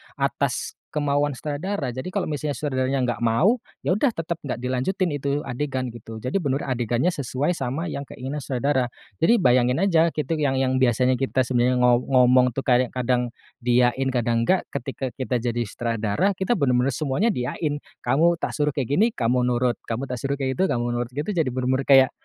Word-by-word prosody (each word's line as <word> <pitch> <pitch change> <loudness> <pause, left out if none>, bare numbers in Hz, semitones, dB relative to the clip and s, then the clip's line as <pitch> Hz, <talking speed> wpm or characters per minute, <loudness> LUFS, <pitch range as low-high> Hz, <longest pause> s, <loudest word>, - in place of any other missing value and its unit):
atas - - -1
kemauan 145 -1 0
sutradara. 150 -2 -3
Jadi, 130 +7 -5
kalau 195 0 -1
misalnya 150 -1 -3
sutradaranya 130 -2 0
gak 115 - -11
mau, 160 - +3 0.2
ya 180 - +3
udah 250 +7 +2
tetap 165 -4 -4
gak 140 - -4
dilanjutin 130 +8 -1
itu 140 +1 -1
adegan 130 0 -2
gitu. 115 -1 -9
Jadi 130 - -2
benar 140 -1 -1
adegannya 120 +8 0
sesuai 140 +4 -1
sama 155 +3 -3
yang 145 -4 -4
keinginan 135 +3 -5
sutradara. 130 0 0 0.3
Jadi, 230 +8 +5
bayangin 125 -3 +3
aja 170 -3 +3
kitu 155 +1 -2
yang 140 -3 +1
yang 130 0 +1
biasanya 125 +1 +3
kita 130 -1 +1
sebenarnya 125 0 +2
ngo 120 -1 +5
ngomong 125 -1 +5
tuh, 135 - -1
kayak 125 -1 +3
kadang 125 -1 0 0.3
diiyain, 125 +2 +2
kadang 120 -2 +1
enggak, 185 0 +2
ketika 130 +1 -4
kita 130 -2 -1
jadi 120 0 -2
sutradara, 115 - 0
kita 190 +5 0
benar-benar 125 -3 +2
semuanya 155 - +1
diiyain, 145 - -2 0.2
"Kamu 165 +7 +2
tak - - -2
suruh 150 -1 +1
kayak 135 -4 -2
gini, 180 +10 +4
kamu 125 +1 +1
nurut, 125 0 +1
kamu 125 +4 -4
tak 125 - -3
suruh 135 +3 -2
kayak 130 +2 -1
gitu, 190 - +3
kamu 120 0 -1
nurut," 120 0 -3
gitu, 145 +8 -3
jadi 170 -7 +1
benar-benar 130 +1 0
kayak, 135 -2 +6
130 Hz, 185 wpm, -24 LUFS, 125-150 Hz, 0.3 s, kayak